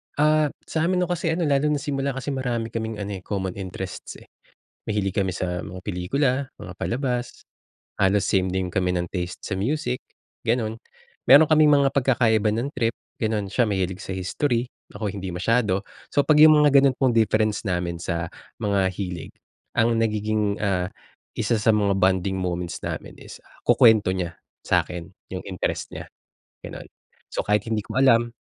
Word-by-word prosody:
Ah, 155 +1 +4 0.2
sa 160 +1 -1
amin 185 0 +1
'no - - -1
kasi 175 -1 -1
ano 170 +1 -1
lalo 145 -1 +2
na 150 - +2
simula 140 -2 -2
kasi 135 +2 -3
marami 120 -4 -2
kaming 110 -1 -3
ano, 100 0 -4
eh, - - -20
common 95 -2 -3
interests, 95 0 -6
eh, - - -19 0.5
mahilig 100 -3 -1
kami 95 -2 +1
sa 90 0 -3
mga 90 -2 -7
pelikula, 105 +9 0 0.3
mga 90 - -8
palabas, 125 +2 -3 0.6
halos 100 +1 +3
same 95 -1 +2
din 90 -1 -2
kami 90 -1 +1
ng 90 0 0
taste 90 -1 -4
sa - - -3
music, 125 - -1 0.4
gano'n. 115 -1 -1 0.5
Meron 150 +3 +9
kaming 155 -1 +5
mga 140 -1 +4
pagkakaiba 115 -5 +3
ng 115 +6 -1
trip 115 0 0 0.3
gano'n, 110 -2 0
siya 120 -3 +2
mahilig 95 -2 -1
sa 95 - -5
history, 120 +6 0 0.3
ako 105 -2 -3
hindi 95 -2 -5
masyado. 100 +2 +1 0.2
So 145 - +2
pag 150 -1 +5
yung 155 0 +9
mga 150 -1 +4
ganon 135 -2 +3
pong 130 -3 +2
difference 110 -1 +2
namin 90 -2 -2
sa 85 0 -2 0.3
mga 100 -3 +1
hilig 90 -4 -5 0.5
ang 115 +1 +4
nagiging, 105 -2 0
ah, 90 -3 0 0.4
isa - - 0
sa 110 - +4
mga 100 -2 +2
bonding 95 0 +2
moments 90 -2 -3
namin - - -5
is - - -11 0.2
kukwento 110 -5 +5
niya 90 -3 -3 0.3
sakin 90 -1 0 0.3
yung 95 -1 -4
interest 95 -3 -3
nya, - - -8 0.5
gano'n. - - -8 0.5
So - - -1
kahit 105 0 +1
hindi 110 -2 -1
ko - - -8
alam 120 -3 +4
105 Hz, 170 wpm, -24 LUFS, 95-125 Hz, 0.6 s, Meron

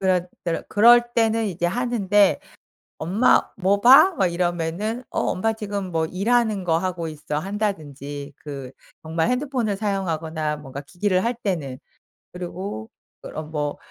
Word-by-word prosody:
그럴 185 -2 +1 0.2
때르 170 -1 -1
그럴 240 +3 +6
때는 225 -1 +2
이제 175 -3 -1
하는데 205 -2 +2 0.6
"엄마 195 +10 +4 0.2
뭐 200 +1 +2
봐?" 270 - +8
막 190 - +3
이러면은 175 +7 -2
"어 - - -1
엄마 225 +5 0
지금 205 -4 -5
뭐 160 -1 +1
일하는 215 +2 +1
거 165 -2 +2
하고 175 -2 -3
있어." 150 -1 -4
한다든지 150 -8 -4
그 135 -3 -8 0.3
정말 160 +1 0
핸드폰을 250 -5 -1
사용하거나 165 -7 -2
뭔가 140 -1 -8
기기를 185 +4 0
할 240 +1 0
때는. 145 -10 -2 0.5
그리고 180 - -6 0.3
그러 155 - -6
뭐 150 -2 -3
185 Hz, 285 characters per minute, -23 LUFS, 160-215 Hz, 0.6 s, 봐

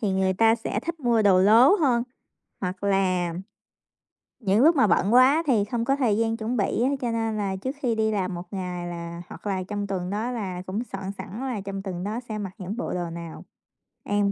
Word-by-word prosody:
thì 210 -5 0
người 190 0 +2
ta 225 +3 +5
sẽ 225 -2 -3
thích 330 +4 -5
mua 235 -4 +2
đồ 190 -3 +5
lố 230 - +7
hơn. 255 -8 +2 0.6
Hoặc 185 +1 -4
là 185 -3 +1 1.1
những 205 -1 +2
lúc 325 +2 +6
mà 255 -7 +4
bận 200 +3 +2
quá 270 +6 +6
thì 220 -7 +3
không 230 +2 -2
có 275 +1 +2
thời 230 -7 +1
gian 225 0 0
chuẩn 230 +2 -2
bị 205 +3 0
á 260 - +3
cho 240 - -1
nên 225 -1 -1
là 195 -2 -1
trước 260 +9 -4
khi 235 -4 +1
đi 220 0 +1
làm 190 -3 -1
1 175 - -5
ngày 180 -2 -4
là 170 0 -6
hoặc - - -9
là 190 -2 -1
trong 205 +1 -4
tuần 185 -2 -3
đó 220 +5 -2
là 190 -7 -4
cũng 205 +5 -2
soạn 195 0 -4
sẵn 200 +3 -7
là 255 -6 -3
trong 195 0 -5
tuần 180 -2 -5
đó 215 +4 -3
sẽ 215 - -3
mặc 195 -3 -4
những 200 +4 -5
bộ - - -3
đồ 175 -2 -2
nào. 170 -1 -8 0.6
Em 205 -1 +1
205 Hz, 225 wpm, -25 LUFS, 190-230 Hz, 1.1 s, lố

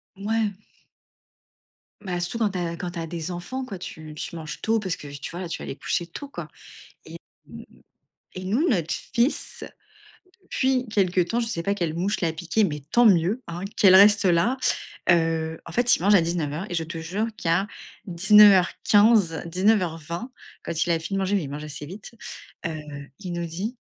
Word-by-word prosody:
Ouais. 215 +2 0 1.5
Bah, 180 -3 -3
souvent, 215 +5 0
tu 190 - -5
as 170 -1 -3
quand 175 +1 -4
tu 175 - -6
as 165 - -4
des 165 0 -5
enfants, 185 +10 -5
quoi, 200 -6 -7
t, 180 - -8 0.3
tu 155 - -6
manges 160 -2 -7
tôt 225 0 +2
parce 190 -5 -2
que, 145 - -11
tu - - -6
vois, 175 +1 -6
tu - - -5
vas - - -6
les - - -5
coucher 170 +4 -2
tôt, 280 +11 -8
quoi. - - -7 1.0
Et, - - -18
hem, - - -11 0.7
et 185 - -7
nous, 230 - +1
notre 170 - 0 0.2
fils, 245 +3 0 0.8
depuis 260 -6 0
quelque 190 -4 +2
temps, 180 +7 0
je 240 - 0
sais 175 -7 -3
pas 200 +4 0
quelle 170 -5 -2
mouche 195 +5 -1
l'a 165 -2 0
piqué, 175 +6 0
mais 150 -6 -2
tant 240 +4 +5
mieux! 190 +3 +3
Hein, 170 +1 -6 0.2
qu'elle 190 -2 +6
reste 205 +2 +7
là. 185 +8 +3 0.5
Heu, 165 -2 +2
en 170 - -10
fait, 245 +5 +4
il - - -9
mange 205 +2 +5
à - - +5
19:00 165 0 -2
et - - -3
je 165 - 0
te 165 +1 -6
jure 185 +7 -2
qu'à 175 +4 0 0.4
19:15, 200 0 +5
19:20, 180 - 0 0.3
quand 160 - -1
il 175 - -3
a 165 - +3
fini 180 +5 -4
de - - 0
manger, 195 +1 +1
mais 185 - -1
il 140 - -7
mange 150 +2 -6
assez 150 -1 -7
vite, 195 +8 -10 0.5
heu 150 -3 -7
il 185 -3 -5
nous 170 0 -3
dit: 195 +9 -5
180 Hz, 195 wpm, -25 LUFS, 165-210 Hz, 1.5 s, reste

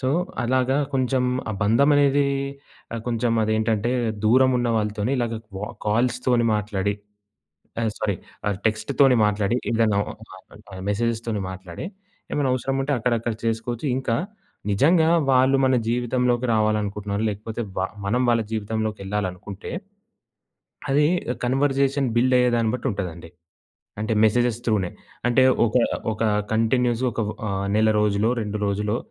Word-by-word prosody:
So, 130 - 0 0.3
అలాగా 130 +2 +1 0.2
కొంచెం 130 -1 +1 0.3
ఆ - - -2
బంధమనేది 140 +5 +4 0.7
ఆహ్, 115 - -3
కొంచెం 115 0 0
అదేంటంటే, 110 +1 0 0.3
దూరమున్న 125 +1 +4
వాళ్ళతోని 105 +3 -1
ఇలాగా 115 -1 -1 0.2
వ 100 - -5 0.2
కాల్స్ 120 +4 +1
తోని 120 -2 +3
మాట్లాడి 100 -1 -1 0.9
ఆహ్, 110 -2 0
సారీ 105 -3 -1 0.3
ఆహ్, 100 -2 -1
టెక్స్ట్ 110 +4 0
తోని 135 -3 +6
మాట్లాడి 105 +3 +1
ఏదైనా 110 -3 +2
ఒక - - -8 0.2
నార్మల్ 95 +2 -15
ఆహ్, 95 - -7
మెసేజెస్ 115 +2 0
తోని 105 -3 -1
మాట్లాడి, 95 - -8 0.5
ఏమైనా 140 -3 0
అవసరముంటే 135 +2 -1
అక్కడ, 120 +1 0
అక్కడ 115 0 -2
చేసుకోచ్చు. 115 +3 -2
ఇంకా 125 -3 -1 0.6
నిజంగా 160 - +4 0.2
వాళ్ళు 130 +1 +4
మన 130 - +3
జీవితంలోకి 125 +1 +1
రావాలనుకుంటున్నారు, 105 -1 0
లేకపోతే 110 +3 -5 0.2
వ - - +1 0.3
మనం 120 +5 +1
వాళ్ళ 115 -1 +3
జీవితంలోకెళ్ళాలనుకుంటే, 105 -3 -3 1.2
అది 145 +2 +4 0.4
కన్వర్సేషన్ 135 +1 +1
బిల్డ్ 125 +2 +3
అయ్యేదాన్ని 120 -3 +2
బట్టుంటదండి. 90 -10 -4 0.7
అంటే 110 +1 -1
మెసేజెస్ 120 +1 +2
త్రూ‌నే. 105 -6 +1 0.4
అంటే 120 +2 +4 0.2
ఒక, 110 - 0 0.4
ఒక 110 - -4 0.3
కంటిన్యూయస్‌గా 120 +2 +1
ఒక 115 - -3
వ 105 - -3 0.2
ఆహ్, 100 0 -2
నెల 110 0 +4
రోజులో, 105 +1 +2
2 105 0 -3
రోజులో, 105 +3 -1
115 Hz, 130 wpm, -23 LUFS, 105-125 Hz, 1.2 s, తోని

